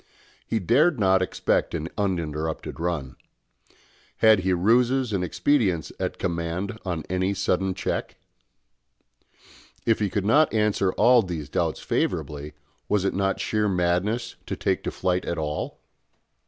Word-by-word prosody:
He 115 Hz, -, 0 dB
dared 130 Hz, -, +3 dB
not 95 Hz, -2 st, +4 dB
expect 95 Hz, -, 0 dB
an 80 Hz, 0 st, -3 dB
uninterrupted 80 Hz, -7 st, -2 dB
run. 80 Hz, -7 st, -3 dB, 1.0 s
Had 110 Hz, -2 st, +6 dB
he 95 Hz, +1 st, 0 dB
ruses 120 Hz, +6 st, +2 dB
and 95 Hz, -2 st, 0 dB
expedients 95 Hz, -, +1 dB
at -, -, -2 dB
command 85 Hz, +4 st, -3 dB
on 85 Hz, -5 st, -3 dB
any 95 Hz, +2 st, 0 dB
sudden 95 Hz, -1 st, 0 dB
check? 95 Hz, -, -3 dB, 1.7 s
If 115 Hz, -, +3 dB
he 105 Hz, -2 st, 0 dB
could 100 Hz, +1 st, -2 dB
not 145 Hz, +8 st, +4 dB
answer 105 Hz, -3 st, +2 dB
all 125 Hz, 0 st, +5 dB
these 85 Hz, -7 st, -5 dB
doubts -, -, -1 dB
favourably, 75 Hz, +1 st, -2 dB, 0.4 s
was 105 Hz, -2 st, +1 dB
it -, -, +1 dB
not 95 Hz, 0 st, 0 dB
sheer 105 Hz, -1 st, 0 dB
madness 95 Hz, +6 st, 0 dB
to -, -, -3 dB
take -, -, 0 dB
to -, -, -1 dB
flight 90 Hz, 0 st, -1 dB
at 85 Hz, -, -3 dB
all? 75 Hz, -1 st, -3 dB
95 Hz, 140 wpm, -25 LUFS, 85-110 Hz, 1.7 s, Had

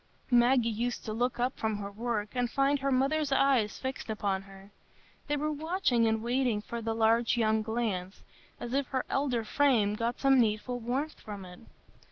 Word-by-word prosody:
Maggie 245 Hz, 0 st, +4 dB
used 235 Hz, +2 st, -2 dB
to 215 Hz, -, -3 dB
look 245 Hz, +2 st, -1 dB
up 250 Hz, +2 st, 0 dB
from 220 Hz, -1 st, -1 dB
her 200 Hz, 0 st, -6 dB
work 215 Hz, -1 st, -2 dB
and 245 Hz, -1 st, 0 dB
find 275 Hz, +2 st, +2 dB
her 275 Hz, +1 st, -1 dB
mother's 275 Hz, +3 st, +1 dB
eyes 265 Hz, -6 st, +2 dB
fixed 260 Hz, -3 st, -5 dB
upon 200 Hz, -3 st, -1 dB
her; 195 Hz, 0 st, -15 dB, 0.6 s
they 295 Hz, 0 st, 0 dB
were 305 Hz, +1 st, -1 dB
watching 300 Hz, -6 st, +1 dB
and 220 Hz, 0 st, 0 dB
waiting 245 Hz, -2 st, +1 dB
for 235 Hz, +2 st, -6 dB
the 225 Hz, 0 st, -2 dB
large 230 Hz, +2 st, +3 dB
young 220 Hz, -1 st, +2 dB
glance, 215 Hz, -5 st, -3 dB, 0.4 s
as 240 Hz, -, -5 dB
if 275 Hz, -1 st, 0 dB
her 260 Hz, -2 st, -2 dB
elder 260 Hz, -5 st, 0 dB
frame 220 Hz, -3 st, +2 dB
got 230 Hz, +3 st, -2 dB
some 270 Hz, -1 st, +4 dB
needful 230 Hz, +2 st, 0 dB
warmth 260 Hz, +7 st, -3 dB
from 205 Hz, -3 st, -8 dB
it. 180 Hz, 0 st, -12 dB
235 Hz, 185 wpm, -30 LUFS, 215-265 Hz, 0.6 s, Maggie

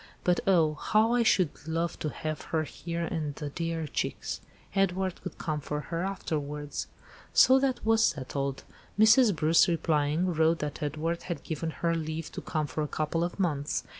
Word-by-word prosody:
But 180 Hz, -1 st, +3 dB
oh! 165 Hz, -5 st, +4 dB
how 215 Hz, +9 st, +2 dB
I 245 Hz, -, +3 dB
should 185 Hz, -8 st, +3 dB, 0.2 s
love 165 Hz, +1 st, -1 dB
to 155 Hz, -, -2 dB
have 155 Hz, +1 st, -4 dB
her 160 Hz, -1 st, 0 dB
here 170 Hz, +2 st, -5 dB
and 155 Hz, -4 st, -3 dB
the 150 Hz, -1 st, -5 dB
dear 165 Hz, 0 st, -2 dB
chicks. 150 Hz, -, -3 dB, 0.3 s
Edward 190 Hz, -1 st, 0 dB
could -, -, -7 dB
come 155 Hz, -2 st, -2 dB
for 150 Hz, +1 st, -3 dB
her 165 Hz, +4 st, -3 dB
afterwards." 150 Hz, -6 st, -3 dB, 0.5 s
So 260 Hz, +1 st, +7 dB
that 265 Hz, -4 st, 0 dB
was 225 Hz, 0 st, +4 dB
settled. 135 Hz, 0 st, -1 dB, 0.3 s
Mrs. 220 Hz, 0 st, +6 dB
Bruce, 155 Hz, +2 st, +4 dB
replying, 165 Hz, +1 st, +1 dB
wrote 160 Hz, +1 st, +3 dB
that 150 Hz, -2 st, -4 dB
Edward 155 Hz, +3 st, -2 dB
had 175 Hz, -, -3 dB
given 160 Hz, 0 st, -3 dB
her 170 Hz, +1 st, -1 dB
leave 160 Hz, -1 st, -3 dB
to -, -, -6 dB
come 155 Hz, -1 st, -1 dB
for 145 Hz, +2 st, -3 dB
a 150 Hz, -, -1 dB
couple 155 Hz, +3 st, -1 dB
of 175 Hz, +3 st, -4 dB
months. 150 Hz, -6 st, 0 dB
165 Hz, 175 wpm, -29 LUFS, 150-180 Hz, 0.5 s, So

